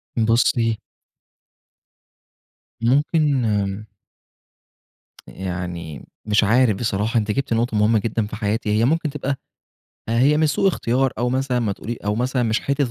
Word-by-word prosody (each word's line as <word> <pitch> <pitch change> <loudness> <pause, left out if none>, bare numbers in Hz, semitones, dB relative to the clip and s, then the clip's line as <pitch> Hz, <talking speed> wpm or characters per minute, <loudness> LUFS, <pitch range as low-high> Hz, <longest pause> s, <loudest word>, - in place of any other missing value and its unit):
بُصي 115 0 +2 2.0
ممكن 145 +2 +2 1.8
يعني 90 -5 -6 0.2
مش 105 +1 +3
عارف 115 +1 +3
بصراحة، 110 +1 -1
أنتِ 105 -1 0
جبتِ 135 -1 -1
نقطة 115 -1 0
مهمّة 105 +1 +3
جدًا 110 0 -2
في - - -7
حياتي، 105 +1 -2
هي 115 - +3
ممكن 160 +3 +1
تبقى 140 -1 -3 0.7
هي 130 +6 +3
مش 155 0 +3
سوء 195 +7 +2
اختيار، 130 -5 0
أو 120 +1 +1
مثلًا 130 -1 0
ما 110 -4 0
تقول 115 +4 -6
أو 105 0 0
مثلًا 125 +2 0
مش 110 -1 +1
حتّة 140 +1 0
115 Hz, 130 wpm, -21 LUFS, 105-135 Hz, 2.0 s, مش